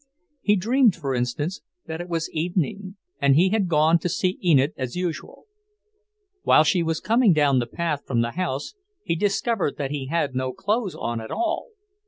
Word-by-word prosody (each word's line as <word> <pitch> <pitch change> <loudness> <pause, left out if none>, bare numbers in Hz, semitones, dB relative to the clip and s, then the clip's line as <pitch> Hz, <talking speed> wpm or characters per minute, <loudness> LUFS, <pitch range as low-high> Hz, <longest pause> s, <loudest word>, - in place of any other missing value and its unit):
He 210 - +3
dreamed, 230 +1 +3
for 140 -6 -3
instance, 130 +8 -2 0.2
that 160 +1 -5
it 175 - -8
was 165 -1 -1
evening, 180 +4 -2 0.3
and 140 -1 +4
he 180 +5 +4
had 205 -2 +1
gone 160 +1 +4
to 175 - -2
see 185 +1 -1
Enid 150 -4 +4
as 130 -2 -5
usual. 180 -3 -5 1.0
While 155 - +5
she 175 +3 +2
was 165 -1 -1
coming 230 -3 +3
down 145 -4 +3
the 120 - -2
path 155 +2 -3
from 120 -3 +1
the 115 0 -1
house, 155 -5 -3 0.3
he - - -1
discovered 205 - 0
that 140 -1 -3
he 140 -3 -4
had 145 -3 -1
no 130 0 -2
clothes 210 -2 -1
on 115 -1 -3
at 110 - -8
all! 340 -1 -2
165 Hz, 185 wpm, -24 LUFS, 140-190 Hz, 1.0 s, While